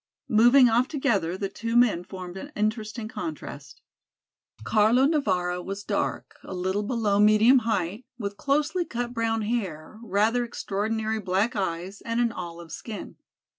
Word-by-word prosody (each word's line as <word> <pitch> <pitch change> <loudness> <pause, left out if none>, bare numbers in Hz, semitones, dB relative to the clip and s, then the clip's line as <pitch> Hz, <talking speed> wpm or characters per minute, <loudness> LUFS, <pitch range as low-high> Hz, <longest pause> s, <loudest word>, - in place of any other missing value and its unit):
Moving 240 +4 +7
off 240 +2 +3
together 220 - 0
the 195 - -2
two 230 +4 -4
men 220 -8 +4
formed 180 -1 -8
an 285 +10 -8
interesting 215 +1 -2
contrast. 155 - -7 0.8
Carlo 220 - +4
Navara 185 - +1
was 195 +2 -5
dark, - - -3
a 190 - -7
little 190 +3 -1
below 210 -2 0
medium 215 +5 +6
height, 200 +3 -2
with 205 -3 -4
closely 295 - 0
cut 245 -5 -4
brown 225 -1 0
hair, 210 -4 -3
rather 225 +3 +1
extraordinary 220 -1 -2
black 200 +5 0
eyes 190 0 -3
and 230 +1 -1
an 235 -1 +2
olive 170 -4 -8
skin. 220 +5 -7
215 Hz, 140 wpm, -26 LUFS, 190-235 Hz, 0.8 s, Moving